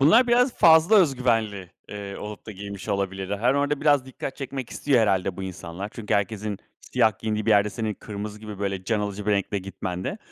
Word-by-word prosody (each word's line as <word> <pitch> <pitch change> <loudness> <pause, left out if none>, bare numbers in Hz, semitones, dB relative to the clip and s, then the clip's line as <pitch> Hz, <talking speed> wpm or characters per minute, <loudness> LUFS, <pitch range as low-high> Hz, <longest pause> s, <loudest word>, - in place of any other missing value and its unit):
Bunlar 220 - +6
biraz 245 +1 +4
fazla 165 +6 +6
öz 160 -9 +5
güvenli, 110 -7 0 0.2
eee, 100 -1 -6
olup 105 0 -8
da - - -6
giymiş 100 0 -8
olabilirler. 95 0 -2
Hani, 125 +5 +2
orada 145 0 0
biraz 145 -3 +3
dikkat 130 0 -6
çekmek 135 -3 -5
istiyor 135 -4 +2
herhâlde 95 -4 +1
bu 95 - -5
insanlar 95 +1 -6
çünkü 110 -3 -2
herkesin 105 0 -1 0.2
siyah 110 -5 +1
giyindiği 110 -1 -2
bir - - +3
yerde 105 0 +4
senin 110 0 -3
kırmızı 105 0 -7
gibi, 105 -2 -8
böyle, 100 -2 -3
can 105 +2 0
alıcı 100 0 -4
bir - - +2
renkle 100 0 0
gitmen 95 -1 -5
de - - -3
105 Hz, 205 wpm, -25 LUFS, 100-130 Hz, 0.2 s, Bunlar